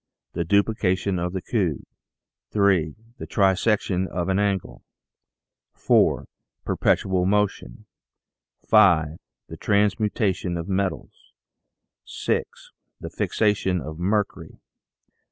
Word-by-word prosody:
The 85 - -1
Duplication 100 -1 +1
of 90 +1 -2
the 95 -1 -5
Cube. 95 - -1 0.7
3. 95 -7 +2 0.2
The - - -7
Trisection 95 -1 +1
of 90 0 -3
an 95 +1 +1
Angle. 100 -3 -2 0.9
4. - - +2 0.4
Perpetual 95 -1 +1
Motion. 100 -12 -1 0.8
5. 85 -7 +4 0.3
The - - -9
Transmutation 100 -3 0
of 85 - -4
the 95 - -3
Metals. 95 0 -4 0.7
6. - - -4 0.3
The - - -8
Fixation 100 -4 0
of 80 +2 -8
Mercury. 100 +3 -2
95 Hz, 100 wpm, -24 LUFS, 90-105 Hz, 0.9 s, 5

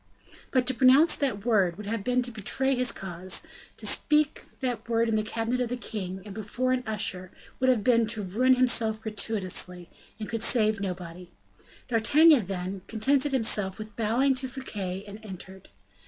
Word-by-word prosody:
But 255 -1 +1
to 260 - -1
pronounce 270 +6 +5
that 235 -8 -2
word 195 -7 +2
would 210 - -8
have 220 0 -3
been 250 +2 +1
to 245 - -2
betray 260 +5 0
his 250 -1 +1
cause; 185 -1 -3 0.3
to - - -5
speak 300 -1 +2 0.2
that 240 -4 -4
word 230 0 +1
in 225 - -1
the 215 - +2
cabinet 225 +3 -2
of 245 - -1
the 250 - -3
king, 190 -5 -6
and 205 - -9
before 225 +5 -2
an 255 -1 0
usher, 195 -4 -3 0.3
would 260 0 +2
have 240 -5 +2
been 230 -2 +3
to 220 -1 -3
ruin 250 +8 +2
himself 235 -3 +3
gratuitously, 195 -5 -1 0.3
and 215 - -5
could 230 -1 -4
save 215 -3 +2
nobody. 180 -2 -6 0.6
D'Artagnan 265 - +5
then, 190 0 -5
contented 270 +6 +2
himself 210 -6 +1
with 215 -1 -9
bowing 235 +5 +1
to 260 0 0
Fouquet 200 -8 -5
and 210 +2 -11
entered. 190 -1 -11
220 Hz, 175 wpm, -27 LUFS, 195-250 Hz, 0.6 s, pronounce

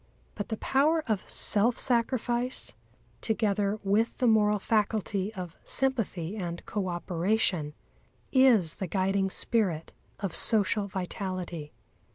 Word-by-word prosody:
But 205 - -5
the 220 - -2
power 305 +7 +2
of 215 -5 -2
self 225 +4 +3
sacrifice, 245 0 0 0.5
together 210 -1 0
with 205 +4 +1
the 255 - 0
moral 210 -2 +4
faculty 205 -1 0
of 180 -3 -6
sympathy 220 -9 -1
and 170 -3 -5
co 200 -2 -3
operation, 175 -2 -1 0.6
is 240 - +4
the 190 - -3
guiding 190 +2 0
spirit 190 -7 -1 0.3
of 195 -3 -3
social 210 -1 +3
vitality. 185 -4 -5
205 Hz, 115 wpm, -28 LUFS, 185-225 Hz, 0.6 s, moral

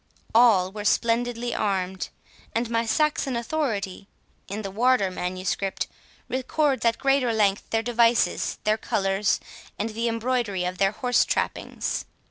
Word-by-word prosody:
All 220 -6 +5
were 210 +1 -6
splendidly 240 +2 +1
armed, 190 -2 -1 0.5
and 230 0 0
my 230 0 +1
Saxon 300 0 +1
authority 225 -7 -2 0.4
(in 205 +2 -5
the 195 - -4
Wardour 225 -2 +3
Manuscript) 185 +2 -2 0.4
records 265 +2 0
at 230 0 +3
great 275 0 +3
length 215 -5 +1
their 225 0 0
devices, 235 0 +2
their 215 +1 +2
colours, 195 0 +1 0.4
and 220 +2 -2
the 230 +2 -1
embroidery 230 -4 0
of 180 0 -4
their 195 0 +3
horse 245 +2 +2
trappings. - - -2
225 Hz, 130 wpm, -25 LUFS, 195-245 Hz, 0.5 s, All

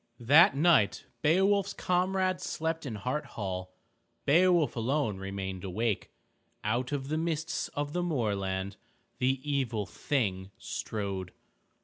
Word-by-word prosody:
That 140 +4 +6
night 155 -10 +4 0.2
Beowulf's 195 +5 +3
comrades 185 0 0
slept 160 -1 -2
in 115 - -4
Hart 125 +8 -2
Hall. 95 -3 -3 0.5
Beowulf 170 0 +4
alone 120 -2 0
remained 95 -1 -5
awake. 105 +3 -1 0.5
Out 120 +5 0
of 140 -1 -3
the 155 +1 0
mists 165 -1 -2
of 145 0 -2
the 180 - 0
moorland 100 - -1 0.4
the 130 +1 +2
Evil 130 -7 0
Thing 100 -3 -1
strode. 95 -4 -4
130 Hz, 115 wpm, -30 LUFS, 100-160 Hz, 0.5 s, That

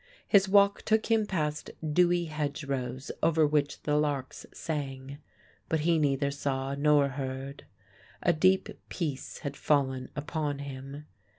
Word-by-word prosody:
His 195 -2 +5
walk 200 0 +5
took 220 +1 +1
him 220 -2 +3
past 150 -5 -2 0.2
dewy 175 +2 +3
hedgerows 140 -4 -3
over 160 -1 +4
which 145 -1 0
the 150 - +1
larks 145 -3 -2
sang. 140 -3 -5 0.5
But 160 -1 +1
he 165 +1 +3
neither 140 -1 +1
saw 135 -1 -2
nor 145 0 +3
heard. 135 +1 -5 0.6
A 175 - +4
deep 185 +4 +3 0.2
peace 150 -7 -4
had 140 0 -3
fallen 130 -4 +1
upon 145 0 -2
him. 140 +1 -8
145 Hz, 130 wpm, -29 LUFS, 140-160 Hz, 0.6 s, His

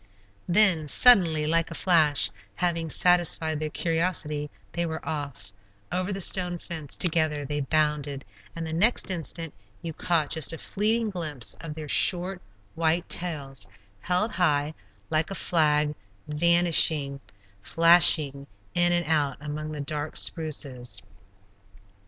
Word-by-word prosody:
Then, 180 -5 +4
suddenly, 165 - +6
like 165 +1 0
a 165 - -8
flash, 155 - +2 0.2
having 170 0 -2
satisfied 165 -2 +1
their 155 0 -3
curiosity, 160 -3 -2 0.2
they 170 - -2
were 160 -1 -6
off 140 -10 -6 0.4
over 185 +2 -2
the 195 - -4
stone 180 -1 +2
fence 160 -5 -6
together 155 -4 0
they 145 +1 -3
bounded, 145 -1 -1 0.3
and 165 -1 -5
the 160 - -6
next 205 +4 +2
instant 165 -2 -3 0.3
you 165 -1 -5
caught 160 -2 -1
just 160 -1 +2
a - - -6
fleeting 220 +5 0
glimpse 155 - -3
of 160 -2 -8
their 155 -1 -8
short, 180 +4 0 0.3
white 165 +1 0
tails, 140 - -4 0.3
held 180 - -1
high, 155 -4 0 0.4
like 155 +1 +1
a 195 - -5
flag, 150 -4 +1 0.3
vanishing, 160 -3 +2 0.4
flashing 155 - +4 0.3
in 175 0 +3
and 175 -1 +1
out 150 -3 0
among 150 +1 -6
the 150 -1 -6
dark 150 +1 -5
spruces. 140 -6 -2
160 Hz, 130 wpm, -25 LUFS, 150-175 Hz, 0.4 s, suddenly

